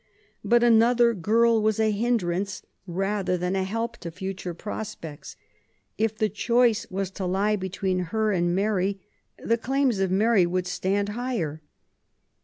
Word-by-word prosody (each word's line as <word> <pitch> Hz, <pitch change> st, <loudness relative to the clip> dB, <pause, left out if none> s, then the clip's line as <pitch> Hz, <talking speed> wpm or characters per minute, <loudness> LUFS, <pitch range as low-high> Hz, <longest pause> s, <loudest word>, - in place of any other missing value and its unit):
But 240 Hz, 0 st, +3 dB
another 235 Hz, +1 st, +5 dB
girl 225 Hz, +4 st, +3 dB
was 215 Hz, 0 st, +1 dB
a 220 Hz, -1 st, +3 dB
hindrance 200 Hz, -4 st, -1 dB, 0.2 s
rather 190 Hz, +1 st, -1 dB
than 180 Hz, +2 st, -1 dB
a 190 Hz, -, +1 dB
help 230 Hz, +4 st, -3 dB
to 170 Hz, -, -7 dB
future 185 Hz, 0 st, -6 dB
prospects. 205 Hz, -6 st, -7 dB, 0.6 s
If 220 Hz, 0 st, -1 dB
the 215 Hz, -, +2 dB
choice 235 Hz, +1 st, +2 dB
was 195 Hz, 0 st, -3 dB
to 190 Hz, -1 st, -4 dB
lie 200 Hz, +4 st, +1 dB
between 190 Hz, -1 st, -2 dB
her 220 Hz, +1 st, +1 dB
and 175 Hz, -2 st, +1 dB
Mary, 195 Hz, -1 st, 0 dB, 0.4 s
the 230 Hz, +1 st, 0 dB
claims 265 Hz, -3 st, +1 dB
of 190 Hz, -1 st, +1 dB
Mary 200 Hz, -1 st, +3 dB
would 180 Hz, +1 st, -1 dB
stand 190 Hz, +3 st, -1 dB
higher. 210 Hz, -, -3 dB
200 Hz, 145 wpm, -25 LUFS, 185-225 Hz, 0.6 s, another